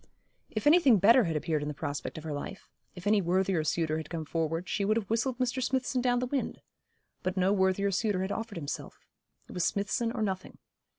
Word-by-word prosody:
If 215 - -4
anything 295 -7 +6
better 230 +5 +6
had 165 -2 -1
appeared 155 0 0
in 145 - -3
the 150 - -4
prospect 145 0 -4
of 155 - -7
her 155 -2 -4
life 145 +7 -6 0.3
if 180 0 -10
any 205 0 +4
worthier 185 -1 +1
suitor 155 0 0
had 160 -2 -6
come 165 -2 -4
forward, 165 +2 -2
she 200 - -1
would 215 +3 +2
have 215 -4 -2
whistled 235 +2 0
Mr. 255 0 -1
Smithson 255 0 0
down 245 0 +2
the 250 - 0
wind; 265 +1 -2 0.6
but 185 +1 -2
no 185 +2 +3
worthier 190 0 +2
suitor 195 -1 0
had 190 - -3
offered 225 -4 -4
himself. 145 -3 -6 0.4
It - - -12
was 180 - -1
Smithson 210 +5 0
or 230 -3 -2
nothing. 190 -2 -3
195 Hz, 215 wpm, -30 LUFS, 165-230 Hz, 0.6 s, anything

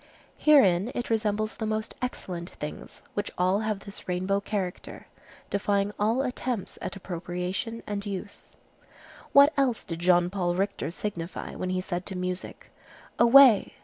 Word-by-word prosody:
Herein 220 - +5
it 240 - -3
resembles 215 -1 0
the 220 - -3
most 215 +1 -2
excellent 180 -8 -4
things, 150 0 -8
which 205 0 -2
all 185 +3 +2
have 215 -2 -2
this 200 0 -10
rainbow 185 +2 0
character, 200 -3 -5 0.5
defying 200 0 +1
all 225 +6 +2
attempts 250 -4 -3
at 185 - -4
appropriation 180 +5 -4
and 205 -1 -3
use. 200 0 -7 0.8
What 280 +2 +7
else 260 -5 +1
did 165 -1 -6
Jean 175 0 +3
Paul 175 -3 0
Richter 195 -1 -1
signify, 175 -1 -5
when 185 - -4
he 185 0 0
said 180 -1 -4
to 190 - -4
music, 180 0 -5 0.5
"Away! 235 -2 +7
200 Hz, 145 wpm, -27 LUFS, 180-220 Hz, 0.8 s, What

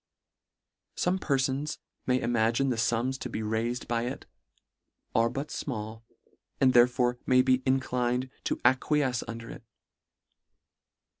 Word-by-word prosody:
Some 180 +2 0
perfons 140 0 0 0.3
may 125 0 +3
imagine 120 +2 +1
the 125 - +1
fums 120 +3 0
to 125 - -5
be 110 - -4
raifed 115 +3 -2
by 120 0 0
it, 130 - -6 0.9
are 115 +1 +3
but 140 +5 -4
fmall, 110 -4 -5 0.6
and 130 -1 +4
therefore 120 0 +4
may 125 0 +5
be 130 0 +3
inclined 125 -1 0
to - - +1
acquiefce 130 0 +2
under 115 0 -7
it. - - -11
125 Hz, 125 wpm, -28 LUFS, 115-130 Hz, 0.9 s, may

